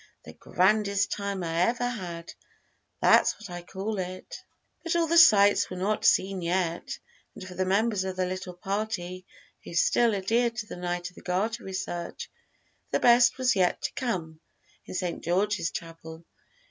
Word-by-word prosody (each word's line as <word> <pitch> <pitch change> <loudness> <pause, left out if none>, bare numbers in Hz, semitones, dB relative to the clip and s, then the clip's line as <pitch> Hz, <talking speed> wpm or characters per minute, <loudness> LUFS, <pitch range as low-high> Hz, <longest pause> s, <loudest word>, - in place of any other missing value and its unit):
The - - -11
grandest 200 +1 +1
time 200 -2 -3
I 165 0 -1
ever 240 +6 +1
had, 175 -8 -6 0.7
that's - - +5
what 210 -3 -11
I 175 0 -6
call 195 +4 -5
it." 185 0 -6 0.4
But 335 0 -2
all 340 -1 +3
the 335 +1 +5
sights 205 -10 +6
were 185 - -6
not 205 +3 -1
seen 190 -1 +3
yet, 170 -1 -2 0.4
and 185 - -9
for 185 - -9
the 185 +1 -2
members 205 +1 +1
of 190 -1 -4
the 185 0 0
little 185 0 -5
party 185 -1 -4 0.4
who 170 - -9
still 230 +5 +3
adhered 230 +5 +1
to 215 - -4
the - - -8
Knight 175 0 -4
of - - -27
the - - -11
Garter 215 +6 -2
research 185 -2 -5 0.6
the - - 0
best 240 0 +5
was 255 -2 +2
yet 185 -2 +2
to - - -1
come, 170 -11 -3 0.5
in - - -7
St. 180 -2 -3
George's 185 0 0
Chapel. 165 -1 -9
190 Hz, 170 wpm, -27 LUFS, 180-215 Hz, 0.7 s, sights